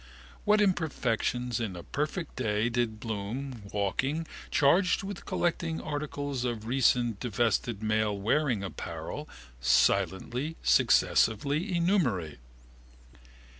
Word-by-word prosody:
What 210 0 +4
imperfections 125 - 0
in 110 -6 -3
a 85 - -8
perfect 155 +4 -3
day 110 -2 0
did 115 -2 -1
Bloom, 115 +4 -4
walking, 130 +11 -1 0.2
charged 180 +8 +3
with 195 -1 -7
collected 170 -1 -1
articles 145 -3 -3
of 115 -3 -3
recently 120 -2 +2
disvested 115 0 0
male 110 -1 +1
wearing 115 +1 +1
apparel, 95 - -6 0.3
silently, 120 - +2
successively, 145 - +3
enumerate? 130 - +1
125 Hz, 95 wpm, -29 LUFS, 110-150 Hz, 0.3 s, What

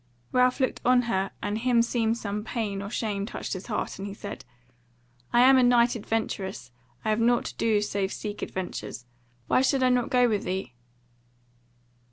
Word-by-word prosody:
Ralph 250 +1 +3
looked 260 -2 0
on 250 0 +4
her 195 -4 0
and 205 +1 -1
himseemed 235 -1 +2
some 210 -2 -4
pain 215 -4 -3
or 200 - -5
shame 205 -3 -2
touched - - -5
his 185 -1 -6
heart, 210 -3 -3
and 195 - -4
he 200 - -7
said: 200 -7 -8 0.9
"I 240 - +5
am 260 +1 +7
a - - +5
knight 245 0 +4
adventurous; 200 - -3 0.3
I 215 - +2
have 215 - +1
nought 240 +1 +3
to - - -6
do 220 -2 +2
save 200 -2 -1
to - - -5
seek 210 -1 -6
adventures. 180 -8 -5 0.4
Why 255 - +3
should 265 0 +2
I 255 - +4
not 250 -1 +1
go 250 -1 +4
with 210 -3 0
thee?" 190 -5 -3
225 Hz, 185 wpm, -27 LUFS, 200-245 Hz, 0.9 s, am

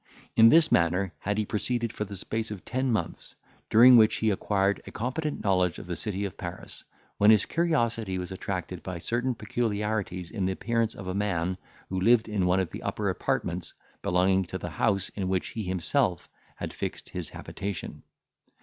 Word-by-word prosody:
In 115 0 +8
this 160 +3 +6
manner 90 +2 +2
had 105 +1 -2
he 110 - +1
proceeded 115 +2 -2
for 105 - -3
the 100 -1 -6
space 110 +4 -3
of 105 -4 -8
ten 130 0 -1
months, 95 -7 -3 0.3
during 120 +3 +8
which 110 -1 +5
he 110 -1 +1
acquired 100 0 +1
a - - -7
competent 140 +6 -3
knowledge 90 -4 +2
of - - -8
the 90 0 -4
city 100 0 -2
of 95 - -6
Paris, 90 0 -8 0.4
when 105 - +6
his 110 -2 +6
curiosity 115 - 0
was 90 0 -5
attracted 95 -1 -4
by 90 -2 -5
certain 120 +7 -1
peculiarities 105 -5 -2
in 100 -5 -1
the 95 - 0
appearance 115 +2 -1
of 100 - -8
a 90 - -3
man 95 -3 -1 0.3
who 95 0 -2
lived 115 +2 +4
in 100 -4 0
one 90 +1 +3
of 95 - -1
the - - -7
upper - - -1
apartments - - -2 0.3
belonging 95 +2 +2
to - - -5
the - - -6
house 100 -2 0
in 95 -2 -4
which 95 -1 -1
he 115 - -5
himself 90 - +1 0.3
had - - -6
fixed - - -5
his - - -3
habitation. 100 -3 -6
100 Hz, 185 wpm, -27 LUFS, 95-115 Hz, 0.4 s, In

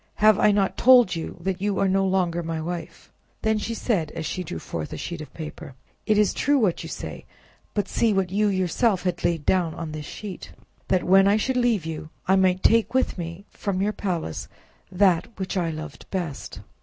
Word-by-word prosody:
Have 215 -1 +5
I 210 - +5
not 200 -2 +1
told 245 -7 +6
you 165 - -5
that 190 +1 -2
you 200 -1 0
are 195 - +2
no 195 +1 +2
longer 180 -3 +1
my 165 -1 -3
wife?" 170 +1 -6 0.3
Then 220 -1 +2
said 210 -7 -1
she, - - -14
as 160 - -3
she 180 +4 -3
drew 120 - -6
forth 80 -1 -5
a - - -5
sheet 170 - -5
of 145 -4 -9
paper— 155 -4 -8 0.3
"It 215 - +3
is 210 -1 +3
true 285 +1 +2
what 205 -9 +1
you - - -7
say; - - -7 0.5
but 205 -2 0
see 230 +3 +2
what 195 -3 0
you 210 +2 +2
yourself 190 +2 +1
have 180 -2 -2
laid 170 -3 0
down 175 -4 +1
on 165 -2 -5
this 150 -1 -6
sheet: 200 -4 -8 0.3
that 185 -2 +2
when 195 +1 +5
I 205 +1 +4
should 260 +4 0
leave 240 -8 +2
you, 155 -1 -5 0.2
I 190 - +5
might 185 -1 +2
take 230 +2 +3
with 260 -7 +1
me, 170 +3 -6
from 195 -2 -3
your 205 +2 +1
palace, 175 - -3 0.4
that 180 -3 +3
which 190 0 -3
I 175 -3 0
loved 155 0 -8
best." 170 -7 -4
185 Hz, 210 wpm, -24 LUFS, 165-205 Hz, 0.5 s, told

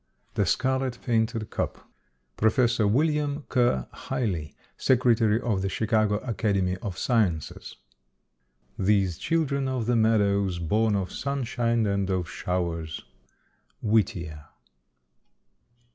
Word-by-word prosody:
THE 100 - +1
SCARLET 130 +1 0
PAINTED 115 -2 0
CUP. - - -4 0.5
PROF. 120 +2 +2
WILLIAM 145 +6 +1
KERR 120 - +2
HIGLEY, 85 - -3 0.2
Secretary 115 -4 +3
of 110 -6 -1
The 95 - -1
Chicago 110 0 +1
Academy 100 -6 0
of 95 -3 -6
Sciences. 100 - -1 1.0
These 95 -3 +2
children 140 -5 0
of 130 -3 -1
the 120 +1 +2
meadows, 100 -4 +2
born 105 +6 +1
Of 95 -2 -2
sunshine 120 -4 -1
and 100 -1 0
of 90 -2 -1
showers. 85 -5 -3 0.8
_Whittier. 85 -8 0
110 Hz, 100 wpm, -26 LUFS, 95-120 Hz, 1.0 s, Secretary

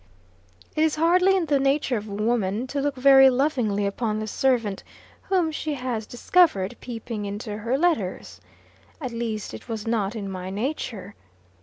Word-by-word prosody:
It 310 - +1
is 315 -1 +2
hardly 365 +4 +4
in 360 - 0
the 285 -2 +2
nature 275 -1 +1
of 215 -1 -4
woman 210 +1 -1
to 280 +2 -3
look 285 0 -1
very 270 0 +7
lovingly 250 -7 +1
upon 215 +2 -1
the 215 - -3
servant 230 -3 0 0.4
whom 360 -4 +1
she 305 -1 -3
has 245 -5 -3
discovered 245 - +2
peeping 225 -3 -5
into 205 +1 -5
her 235 +5 0
letters. 275 - -1 0.6
At 255 -5 -4
least, 230 -2 -4
it - - -10
was 220 -2 -4
not 225 -2 -1
in 205 -3 -4
my 185 -1 -5
nature. 205 -3 -4
235 Hz, 160 wpm, -24 LUFS, 210-280 Hz, 0.6 s, very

